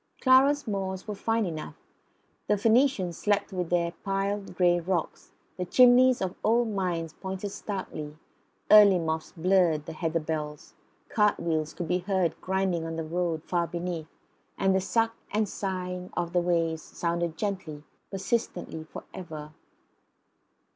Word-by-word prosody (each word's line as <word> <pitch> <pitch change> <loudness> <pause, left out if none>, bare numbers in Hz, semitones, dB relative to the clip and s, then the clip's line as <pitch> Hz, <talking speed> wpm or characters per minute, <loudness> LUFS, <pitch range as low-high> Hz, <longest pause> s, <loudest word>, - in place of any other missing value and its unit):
Clara's 275 +2 +4
moors 190 -2 -3
were 210 - -3
fine 225 +2 0
enough. 155 - -5 0.7
The 210 - +3
Phoenicians 220 - +2
slept 205 -1 0
under 180 -1 0
their 170 -1 +1
piled 195 0 -2
grey 175 -1 +4
rocks; 175 -1 -3 0.3
the 180 - -2
chimneys 250 +3 +6
of 185 - -1
the - - -20
old 235 +1 +3
mines 175 -5 -2
pointed 190 +2 -5
starkly; 155 -8 -6 0.5
early 205 -3 +9
moths 160 -1 -2
blurred 170 -3 +2
the - - -6
heather 165 +1 -1
bells; 150 -2 -5 0.3
cartwheels 165 -7 +1
could 175 - -4
be 180 +3 +1
heard 185 -3 0
grinding 190 -3 0
on 165 0 -4
the 165 - -3
road 165 -1 -2
far 170 -1 0
beneath; 170 -2 -4 0.5
and 190 0 +2
the 190 - +2
suck 225 +3 +1
and 215 +1 0
sighing 180 -2 -4
of 175 -1 -2
the 175 - +3
waves 165 -2 0
sounded 170 -1 -2
gently, 170 -7 -4 0.3
persistently, 195 -5 -2
for - - -9
ever. 155 -4 -8
180 Hz, 145 wpm, -28 LUFS, 165-200 Hz, 0.7 s, early